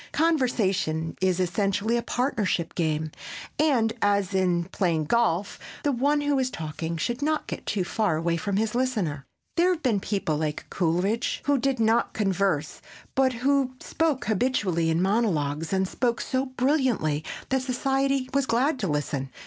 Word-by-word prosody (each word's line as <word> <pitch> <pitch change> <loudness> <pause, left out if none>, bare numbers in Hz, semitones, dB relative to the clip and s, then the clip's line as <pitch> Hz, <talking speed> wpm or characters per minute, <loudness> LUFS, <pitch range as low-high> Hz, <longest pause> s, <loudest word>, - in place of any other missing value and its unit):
Conversation 210 - +1
is 185 -1 +2
essentially 200 +5 +1
a 240 - +1
partnership 225 - -1
game 155 -2 -1 0.5
and, 250 -8 +3
as 200 -1 +2
in 180 -2 +2
playing 170 -5 +1
golf, 205 -2 +1 0.2
the 290 - +2
one 285 +4 +2
who 290 -1 +1
is 260 -1 +1
talking 160 -3 -4
should 240 - -2
not 305 +1 0
get - - -7
too 200 -3 0
far 200 -1 0
away 165 +1 0
from 195 +4 -1
his 220 0 0
listener. 205 - -1 0.3
There 350 +2 +4
have 350 -3 -1
been 230 -7 +2
people 190 -6 -1
like 150 -1 -3
Coleridge 180 +6 0
who 285 -2 +2
did 265 0 0
not 225 +1 +2
converse 190 -7 0 0.3
but 265 -1 +3
who 275 -2 +2
spoke 310 -6 -1
habitually 200 -7 +1
in 165 +2 +2
monologues 165 -8 0
and 190 -1 +1
spoke 235 +3 0
so 265 +1 -1
brilliantly 255 - +1 0.3
that 265 0 +1
society 270 +1 0
was 275 -1 +1
glad 260 +5 +1
to 195 - -1
listen. 145 -3 -2
210 Hz, 155 wpm, -26 LUFS, 170-260 Hz, 0.5 s, There